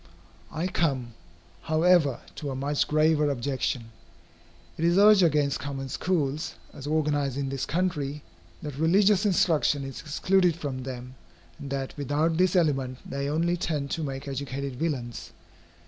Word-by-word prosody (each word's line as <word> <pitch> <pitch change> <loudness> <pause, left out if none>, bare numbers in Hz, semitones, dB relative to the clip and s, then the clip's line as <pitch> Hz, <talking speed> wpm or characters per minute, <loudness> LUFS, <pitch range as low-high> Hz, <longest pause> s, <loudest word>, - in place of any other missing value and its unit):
I 160 +3 -2
come, 135 -10 -1 0.5
however, 160 - +3 0.2
to 145 - -4
a 135 - -3
much 140 +2 0
graver 155 -1 +3
objection. 130 -3 -2 0.8
It 160 - -4
is 170 +2 +3
urged 205 0 +7
against 150 -4 +2
common 135 -1 -5
schools, 150 -1 -1 0.2
as 140 - -8
organized 145 -3 0
in 140 -1 -2
this 135 -1 -3
country, 150 -4 -1 0.4
that 145 -2 -6
religious 195 +5 +4
instruction 160 -6 +2
is 135 -1 -7
excluded 180 +3 +2
from 140 -6 -4
them, 125 -1 -7 0.5
and 140 - -7
that 135 -1 -3
without 150 +3 0
this 185 +1 +3
element 135 -7 +1
they 140 0 -3
only 170 +3 +1
tend 150 -6 -2
to 165 - -2
make 135 -1 -5
educated 140 0 -4
villains. 125 -6 -4
145 Hz, 145 wpm, -27 LUFS, 135-165 Hz, 0.8 s, urged